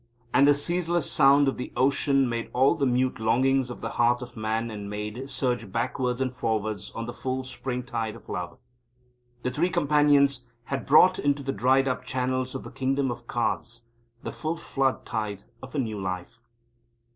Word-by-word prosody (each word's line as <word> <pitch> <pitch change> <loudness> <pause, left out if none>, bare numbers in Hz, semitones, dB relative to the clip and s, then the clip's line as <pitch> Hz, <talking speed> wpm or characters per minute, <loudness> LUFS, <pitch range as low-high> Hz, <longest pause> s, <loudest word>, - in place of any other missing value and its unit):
And 140 - +6
the 145 - +6
ceaseless 170 +2 0
sound 140 +1 +5
of 135 - 0
the 125 - -5
ocean 135 0 +3
made 115 -1 -3
all 130 +2 +4
the 145 -5 0
mute 125 0 +1
longings 130 +4 +2
of 125 - -8
the - - -3
heart 120 +1 +3
of 120 0 -11
man 110 +1 -2
and 105 -1 -6
maid 105 +6 -5
surge 120 -7 -2
backwards 125 +2 -1
and 130 -1 -1
forwards 110 -4 -2
on 115 - -4
the 120 - -6
full 130 0 -3
springtide 125 -3 -4
of - - -15
love. - - -5 0.9
The 125 - -1
Three 165 +7 +1
Companions 145 -5 +3 0.2
had 135 +2 -4
brought 180 +6 +6
into 145 0 0
the 135 0 -2
dried 130 +5 +3
up 125 -1 -1
channels 130 0 -2
of 130 - -5
the - - -9
Kingdom 135 0 0
of 120 0 -8
Cards 120 -1 -2 0.4
the - - -4
full 160 +2 -3
flood 135 -5 -1
tide 105 -3 -3 0.2
of 130 +3 -10
a - - -1
new 110 -6 -2
life. 95 +4 -5
130 Hz, 180 wpm, -26 LUFS, 115-135 Hz, 0.9 s, And